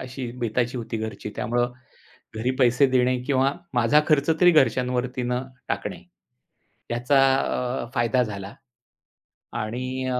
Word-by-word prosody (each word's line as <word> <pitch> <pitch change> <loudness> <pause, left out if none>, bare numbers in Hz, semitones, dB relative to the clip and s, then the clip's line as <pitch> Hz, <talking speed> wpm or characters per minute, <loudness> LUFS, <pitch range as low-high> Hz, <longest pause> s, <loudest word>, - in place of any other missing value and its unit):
अशी 130 -1 -6
बेताची 120 +1 -1
होती 115 -1 -4
घरची, 110 -1 -5
त्यामुळं 120 +2 0 0.6
घरी 120 +3 0
पैसे 125 +1 +4
देणे 125 0 +2
किंवा 135 0 +2 0.2
माझा 120 +5 +4
खर्च 150 0 +3
तरी 180 -1 +7
घरच्यांवरती 125 -4 +1
न 125 0 -1 0.3
टाकणे. - - -4 0.9
याचा 120 +4 +2 0.2
अ, 125 -2 -2
फायदा 120 +1 +2
झाला 100 -2 -6 1.1
आणि 130 +4 -4
अ, 125 -1 0
125 Hz, 125 wpm, -24 LUFS, 120-130 Hz, 1.1 s, तरी